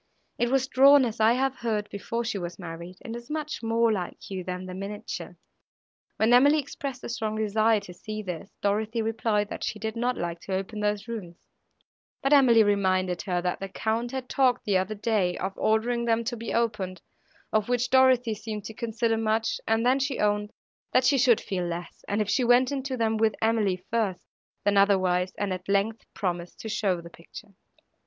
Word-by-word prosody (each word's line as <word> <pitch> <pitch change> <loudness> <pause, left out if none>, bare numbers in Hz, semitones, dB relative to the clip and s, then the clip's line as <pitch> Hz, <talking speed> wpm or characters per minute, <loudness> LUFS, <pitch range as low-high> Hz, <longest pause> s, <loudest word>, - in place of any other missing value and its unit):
It 240 - +2
was 265 0 +2
drawn, 275 0 +6
as 230 -1 -4
I 220 +1 +5
have 270 +1 0
heard, 215 -3 -2
before 230 +4 -3
she 225 -3 -2
was 175 -1 -6
married, 170 0 -8
and 230 -1 -5
is 235 +1 -9
much 305 -1 -4
more 230 0 +2
like 190 -1 -4
you 185 -1 -4
than 180 0 -5
the 185 - -7
miniature." 200 +2 -6 0.8
When 220 +2 +3
Emily 285 +5 +6
expressed 275 -2 -5
a - - -4
strong 220 -3 -2
desire 215 +1 +2
to 185 -3 -10
see 215 +4 -6
this, 180 0 -6
Dorothée 215 +3 0
replied, 220 -2 0
that - - -6
she - - -2
did 220 +2 -4
not 245 +2 0
like 170 -1 -3
to 190 +2 -4
open 195 +3 -4
those 210 +1 -1
rooms; 195 -7 -7 0.8
but 275 +2 +3
Emily 245 -6 +7
reminded 185 -3 +1
her, 180 -3 -2
that 180 -1 -1
the 195 - -5
Count 225 +4 -1
had 260 -1 -4
talked 255 -2 +2
the 205 - +1
other 190 +3 0
day 200 -4 0
of 190 +1 -3
ordering 235 +2 +1
them 230 0 +2
to 240 +1 -3
be 230 -1 -5
opened; 210 -6 -1 0.5
of 215 +1 +1
which 245 0 0
Dorothée 255 -3 +4
seemed 215 -1 -6
to 220 - -6
consider 225 0 -1
much, 220 0 0
and 225 +1 +2
then 260 +2 +4
she 275 -1 -1
owned, 210 0 0 0.4
that 255 - +4
she 275 +1 +4
should 245 -3 +5
feel 185 -2 -3
less, 170 0 -6
if 210 0 0
she 250 +5 +2
went 245 +2 +4
into 270 -1 -3
them 225 -1 +1
with 220 -1 +2
Emily 220 -4 +1
first, 215 -6 -1 0.4
than 205 0 +2
otherwise, 185 -2 +3
and 200 -2 -1
at 185 +1 -7
length 200 +3 0
promised 175 -2 -3
to 220 - -6
show 195 -5 0
the 170 0 -12
picture. 200 +5 -13
220 Hz, 195 wpm, -27 LUFS, 195-235 Hz, 0.8 s, Emily